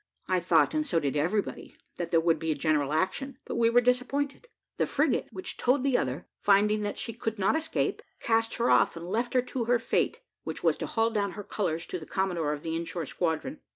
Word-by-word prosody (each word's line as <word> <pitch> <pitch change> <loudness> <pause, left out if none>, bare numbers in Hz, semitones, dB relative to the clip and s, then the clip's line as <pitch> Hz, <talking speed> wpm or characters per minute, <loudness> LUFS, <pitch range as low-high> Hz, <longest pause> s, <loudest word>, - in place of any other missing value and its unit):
I 185 -1 +2
thought, 165 -3 +3
and 310 0 +1
so 250 - +1
did 145 -3 -1
everybody, 180 +8 -1 0.2
that 170 -1 -3
there 165 - +4
would 165 -1 +2
be 160 0 -1
a - - 0
general 145 -1 +1
action, 245 - -1
but - - -5
we 230 -1 +4
were 240 +1 +5
disappointed; 275 - 0 0.3
the - - +1
frigate - - +1
which 375 - -5
towed 255 +2 +2
the 275 -2 +2
other, 130 - -1
finding 210 +1 +3
that 205 0 -3
she 230 - -3
could 225 -1 -3
not 195 +7 +2
escape, 320 0 -1 0.2
cast 225 0 +1
her 235 - +2
off, - - +4
and 165 - -7
left 235 +7 -2
her 250 - +4
to 250 -1 -3
her 245 +1 +3
fate, 230 - 0 0.2
which - - -5
was - - +4
to - - -4
haul 225 0 +1
down 200 -4 -1
her 205 - -7
colours 170 -5 -2
to 180 - -4
the 155 - -11
commodore 175 -6 0
of 150 -1 -4
the 165 0 -2
in 165 - -1
shore 170 -1 -4
squadron. 175 - -2
205 Hz, 230 wpm, -28 LUFS, 165-245 Hz, 0.3 s, were